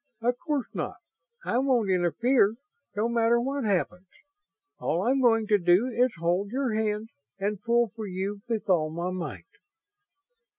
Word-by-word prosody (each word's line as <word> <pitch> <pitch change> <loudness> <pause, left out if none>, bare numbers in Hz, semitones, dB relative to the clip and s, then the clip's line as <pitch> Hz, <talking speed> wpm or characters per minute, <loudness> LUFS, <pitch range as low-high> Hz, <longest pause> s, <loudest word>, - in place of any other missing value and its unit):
"Of 245 +1 0
course 295 -6 -1
not. - - -3 0.5
I 240 - +1
won't 250 -7 +2
interfere, 205 +5 +3 0.4
no 210 +3 +1
matter 235 0 +3
what 270 +1 -2
happens. 185 -2 -1 0.7
All 170 +4 0
I'm 265 +4 +2
going 225 -3 +4
to 210 -1 +3
do 180 +7 +3
is 250 +1 +2
hold 175 +4 0
your 255 0 -1
hand 215 0 -1 0.3
and 200 0 -2
pull 235 -1 +2
for 220 -2 -5
you 195 +2 -4
with 225 -3 -2
all 165 -5 +2
my 170 +3 -3
might." 185 -2 -5
215 Hz, 155 wpm, -27 LUFS, 190-240 Hz, 0.7 s, going